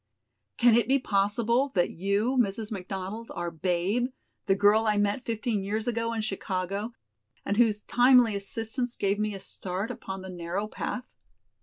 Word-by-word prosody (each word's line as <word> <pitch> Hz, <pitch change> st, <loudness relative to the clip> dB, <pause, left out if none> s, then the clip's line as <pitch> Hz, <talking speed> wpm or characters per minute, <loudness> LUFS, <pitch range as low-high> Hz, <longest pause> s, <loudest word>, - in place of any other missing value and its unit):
"Can 240 Hz, -1 st, +6 dB
it 235 Hz, +1 st, +4 dB
be 270 Hz, +2 st, +4 dB
possible 235 Hz, +4 st, +1 dB
that 175 Hz, -, +2 dB
you, 200 Hz, +8 st, 0 dB
Mrs. 220 Hz, -2 st, 0 dB
McDonald, 195 Hz, +3 st, -5 dB
are 175 Hz, 0 st, -3 dB
'Babe', 185 Hz, +9 st, 0 dB, 0.4 s
the 195 Hz, -, +4 dB
girl 210 Hz, +3 st, +4 dB
I 210 Hz, -1 st, +3 dB
met 205 Hz, +4 st, +1 dB
fifteen 225 Hz, -2 st, -1 dB
years 215 Hz, +3 st, -2 dB
ago 230 Hz, -1 st, -1 dB
in 225 Hz, -, -1 dB
Chicago, 195 Hz, +2 st, -3 dB, 0.5 s
and 200 Hz, -, 0 dB
whose 215 Hz, -3 st, +3 dB
timely 245 Hz, -3 st, +5 dB
assistance 225 Hz, +5 st, -3 dB
gave 200 Hz, +1 st, 0 dB
me 210 Hz, -1 st, -1 dB
a -, -, -6 dB
start 190 Hz, +3 st, -5 dB
upon 190 Hz, 0 st, -6 dB
the 190 Hz, -, -7 dB
narrow 175 Hz, +3 st, -3 dB
path?" 250 Hz, +3 st, -5 dB
210 Hz, 160 wpm, -28 LUFS, 195-230 Hz, 0.5 s, Can